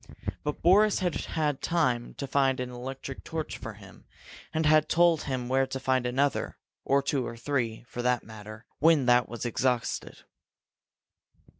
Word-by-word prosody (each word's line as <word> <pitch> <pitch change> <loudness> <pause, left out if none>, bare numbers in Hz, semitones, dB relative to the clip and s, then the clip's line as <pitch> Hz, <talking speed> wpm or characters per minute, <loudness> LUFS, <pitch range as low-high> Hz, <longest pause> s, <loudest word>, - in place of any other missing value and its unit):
But 150 0 -4
Boris 205 +5 +5
had 180 -3 0
had 150 -4 -2
time 125 -9 0
to 140 - -4
find 135 -1 +2
an 125 0 -3
electric 130 +2 -7
torch 160 -1 -5
for - - -7
him, - - -15 0.5
and 160 0 0
had 155 0 +4
told 170 -2 +3
him 130 -3 -3
where 135 +1 +2
to 135 0 -4
find 130 -1 +1
another 135 +3 0 0.3
or 140 0 +2
two 140 -2 0
or 115 - -7
three, 120 -3 -2
for 120 - -5
that 125 0 +1
matter 110 +1 -11
when 155 -3 +4
that 125 0 +4
was 120 +1 -5
exhausted. 120 0 -1
135 Hz, 160 wpm, -28 LUFS, 125-150 Hz, 0.5 s, Boris